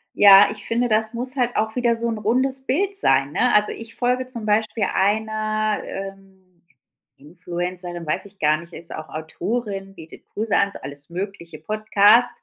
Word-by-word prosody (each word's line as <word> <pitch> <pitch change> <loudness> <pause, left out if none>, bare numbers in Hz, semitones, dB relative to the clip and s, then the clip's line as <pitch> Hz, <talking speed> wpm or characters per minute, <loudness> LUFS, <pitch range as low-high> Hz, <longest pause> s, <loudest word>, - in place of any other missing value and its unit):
Ja, 200 0 +8
ich 210 - -10
finde, 240 +2 +1
das 220 +1 +1
muss 250 +3 -5
halt 245 -2 0
auch 220 0 -1
wieder 240 -2 +2
so 230 +1 -3
'n 225 -2 -3
rundes 260 +5 +1
Bild 390 +10 0
sein, 140 - +3
ne? 250 +11 +2
Also, 210 0 +4
ich 230 0 -8
folge 250 +1 0
zum 235 -4 -5
Beispiel 215 +1 0
einer, 215 +1 0
ähm, 195 -2 -10 0.6
Influencerin, 175 +2 -6
weiß 155 - -2
ich 200 0 -16
gar 150 0 +3
nicht, 170 +2 -13
ist 170 - -10
auch 155 0 -8
Autorin, 195 +5 -4
bietet 160 -3 -13
Kurse 215 0 -1
an, 200 - +2
so - - -7
alles 140 +2 -6
mögliche 170 -2 -6
Podcast 215 +5 +4
210 Hz, 175 wpm, -22 LUFS, 180-230 Hz, 0.6 s, Ja